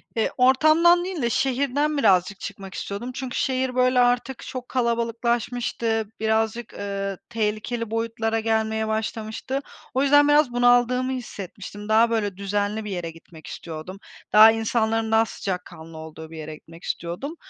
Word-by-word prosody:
Eee, 225 - +1
ortamdan 310 +7 +5
değil 365 -6 -4
de 235 - +1
şehirden 280 +4 0
birazcık 195 -5 +3
çıkmak 195 -1 -8
istiyordum. 225 +6 -5
Çünkü 255 -1 -5
şehir, 260 -1 0
böyle, 255 0 +3
artık 245 +1 +2
çok 255 -1 -7
kalabalıklaşmıştı. 235 -1 -1
Birazcık, 220 +1 0
ııı, 195 -1 -4
tehlikeli 225 +1 -2
boyutlara 225 0 -1
gelmeye 220 0 0
başlamıştı. 220 +4 -3 0.3
O 265 +2 +2
yüzden 290 +1 +6
biraz 290 -3 +4
bunaldığımı 245 +1 +3
hissetmiştim. 205 -3 -7
Daha, 225 +2 +5
böyle, 205 -4 -1
düzenli 205 +2 -2
bir 210 - -5
yere 175 -3 -4
gitmek 160 -1 -15
istiyordum. 165 +3 -7 0.4
Daha 215 +1 +9
insanların 225 0 0
daha 225 0 +4
sıcakkanlı 175 -6 -6
olduğu 160 0 -9
bir 160 - -9
yere 155 0 -7
gitmek 165 +2 -16
istiyordum. 180 - -4
225 Hz, 140 wpm, -24 LUFS, 200-250 Hz, 0.4 s, Daha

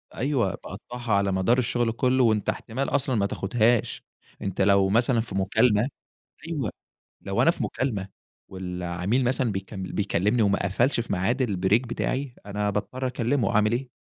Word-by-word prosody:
أيوه، 130 -6 +1
باقطّعها 120 +3 -6
على 100 -1 +2
مدار 95 +7 +2
الشغل 120 -1 +1
كله، 130 +2 +2
وأنت 110 -3 +2
احتمال 130 +4 -2
أصلًا 135 -3 +1
ما 100 - +2
تاخُدهاش، 110 +3 +1 0.4
أنت 95 -1 -2
لو 100 0 +4
مثلًا 115 +3 +3
في 110 -4 -7
مكالمة 105 +4 +3 0.6
أيوه، 145 -10 -2 0.5
لو - - 0
أنا - - +6
في - - -4
مكالمة 105 -8 -2 0.4
والعميل 90 +5 -2
مثلًا 125 -2 +1
بيكم 95 0 -5
بيكلِّمني 105 +4 0
وما 100 -1 +2
قفَلش 120 +7 +1
في 115 - -4
ميعاد 105 +8 +1
الbreak 105 +2 +1
بتاعي، 130 +2 -2
أنا 105 0 -1
باضطَر 105 +6 -3
أكلّمه، 120 -1 0
أعمل 105 +1 +3
إيه. 125 +2 -2
110 Hz, 155 wpm, -26 LUFS, 100-125 Hz, 0.6 s, أنا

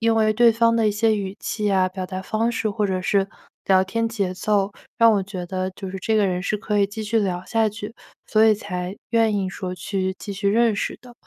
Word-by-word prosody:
因 225 0 +3
为 215 -1 +3
对 235 +2 +5
方 230 +1 +3
的 225 -2 +3
一 - - +2
些 220 +1 +2
语 195 -1 -4
气 210 -2 -2
啊、 190 -1 +3
表 185 0 -5
达 185 0 -5
方 220 +4 0
式 225 -2 -1
或 210 0 0
者 185 -1 -2
是 195 +1 +1 0.4
聊 190 -1 +4
天 230 +4 -1
节 200 -5 -2
奏， 200 +1 0 0.2
让 230 -1 +6
我 200 -2 +1
觉 190 -2 -6
得， 185 +1 -3
就 190 -2 -6
是 190 - -5
这 220 +4 0
个 210 - +3
人 180 -1 -1
是 210 - 0
可 210 0 -1
以 200 - +4
继 210 +2 -6
续 225 +2 +1
聊 185 -4 -1
下 225 +1 +1
去， 210 +1 -8 0.3
所 215 - +3
以 220 -1 +6
才 185 -2 -5
愿 225 -2 +3
意 195 -2 0
说 185 -1 -5
去 190 +1 -2
继 205 - -6
续 200 0 -1
认 225 +1 +3
识 - - -3
的， 245 - -13
205 Hz, 265 characters per minute, -23 LUFS, 190-220 Hz, 0.4 s, 让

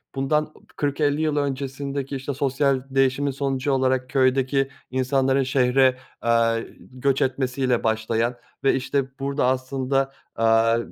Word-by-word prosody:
bundan 150 +3 0 0.2
40-50 145 +1 0
yıl 155 -2 0
öncesindeki, 140 0 -3
işte, 135 +1 -4
sosyal 135 -1 +1
değişimin 135 +1 +1
sonucu 135 0 -1
olarak 130 -1 +1
köydeki 135 +1 +2 0.2
insanların 130 +1 +1
şehire, 130 0 +3 0.3
eee, 115 -1 +2
göç 130 +1 -1
etmesiyle 130 -1 0
başlayan 110 +2 0 0.3
ve 135 - +4
işte 135 0 -2
burada 140 0 0
aslında, 130 +1 0 0.2
aaa, 115 0 +3
135 Hz, 115 wpm, -23 LUFS, 130-140 Hz, 0.3 s, ve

